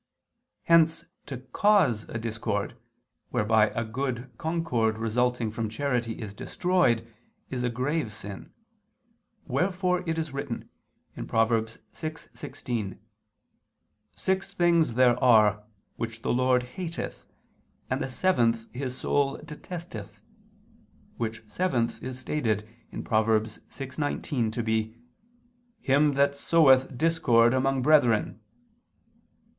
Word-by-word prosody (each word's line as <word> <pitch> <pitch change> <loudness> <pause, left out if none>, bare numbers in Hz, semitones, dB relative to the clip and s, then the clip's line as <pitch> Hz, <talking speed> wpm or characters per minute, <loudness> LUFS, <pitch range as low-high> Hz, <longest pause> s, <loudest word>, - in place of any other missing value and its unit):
Hence 165 -1 +4 0.2
to 140 -3 -5
cause 130 - +2
a - - -4
discord, 110 -2 -3 0.5
whereby 110 0 +3
a 115 - -2
good 125 +2 -3
concord 155 -10 0
resulting 115 +1 0
from 110 0 -3
charity 120 -1 -1
is 105 -3 -6
destroyed, 130 - +1 0.5
is 125 -2 -2
a 125 - +1
grave 130 +2 -1
sin: 100 -1 -8 0.9
wherefore 180 -1 0
it 160 - 0
is 160 -3 -3
written 140 -4 -4 0.6
(Prov. 115 0 +2
6:16): 115 - -4 1.2
"Six 190 +1 -1
things 170 - +3
there 125 0 +4
are, 105 -4 +5 0.3
which 115 0 -5
the - - +1
Lord 125 0 +3
hateth, 165 +7 -6 0.6
and - - -1
the 135 - -2
seventh 115 -8 +1
His 130 0 -4
soul 140 0 +1
detesteth," 150 - -8 1.0
which 115 -1 -3
seventh 125 -7 -1
is 130 -1 -5
stated 115 -7 -1 0.4
(Prov. 110 -1 +2
6:19) 120 +3 -2
to 120 +2 -2
be 110 0 -1 0.8
"him 145 -3 +3
that 140 +1 +3
soweth 135 -4 +4
discord 125 -7 +4
among 130 0 +1
brethren." 125 -8 +3
125 Hz, 105 wpm, -27 LUFS, 115-150 Hz, 1.2 s, are